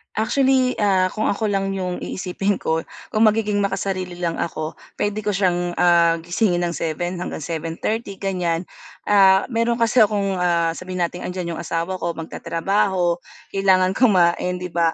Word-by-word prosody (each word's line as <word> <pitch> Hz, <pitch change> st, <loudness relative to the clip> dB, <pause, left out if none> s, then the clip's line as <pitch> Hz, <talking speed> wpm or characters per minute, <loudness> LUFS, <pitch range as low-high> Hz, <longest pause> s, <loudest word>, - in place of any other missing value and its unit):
Actually, 260 Hz, +3 st, +2 dB
ah, 190 Hz, -3 st, +2 dB
kung 215 Hz, -, -1 dB
ako 210 Hz, +2 st, -1 dB
lang 195 Hz, 0 st, 0 dB
yung 180 Hz, -2 st, -3 dB
iisipin 195 Hz, +2 st, -2 dB
ko, 160 Hz, 0 st, 0 dB, 0.3 s
kung 215 Hz, +1 st, +3 dB
magiging 210 Hz, -1 st, +1 dB
makasarili 190 Hz, -2 st, -2 dB
lang 170 Hz, -2 st, -2 dB
ako 155 Hz, -1 st, -4 dB, 0.2 s
pwede 205 Hz, +1 st, -1 dB
ko 210 Hz, -, -2 dB
siyang, 175 Hz, -2 st, 0 dB
ah, 170 Hz, -1 st, +4 dB
gisingin 175 Hz, 0 st, +1 dB
ng 175 Hz, -, 0 dB
7:00 175 Hz, +3 st, -3 dB
hanggang 160 Hz, -, -5 dB
7:30 170 Hz, +7 st, -3 dB
ganiyan, 180 Hz, -4 st, -1 dB, 0.4 s
ah, 195 Hz, -1 st, +5 dB
meron 230 Hz, 0 st, +1 dB
kasi 235 Hz, +1 st, +2 dB
akong, 205 Hz, -2 st, +2 dB
ah, 170 Hz, -2 st, +2 dB
sabihin 185 Hz, 0 st, -4 dB
nating 175 Hz, +1 st, -7 dB
andiyan 180 Hz, -2 st, -4 dB
yung -, -, -4 dB
asawa 170 Hz, +3 st, -3 dB
ko, 170 Hz, -1 st, -2 dB
magtatrabaho 175 Hz, +2 st, 0 dB, 0.3 s
kailangan 190 Hz, -1 st, +3 dB
kumain 180 Hz, -6 st, +3 dB
'di 180 Hz, -, -4 dB
ba 165 Hz, -1 st, +2 dB
185 Hz, 155 wpm, -21 LUFS, 170-205 Hz, 0.4 s, ah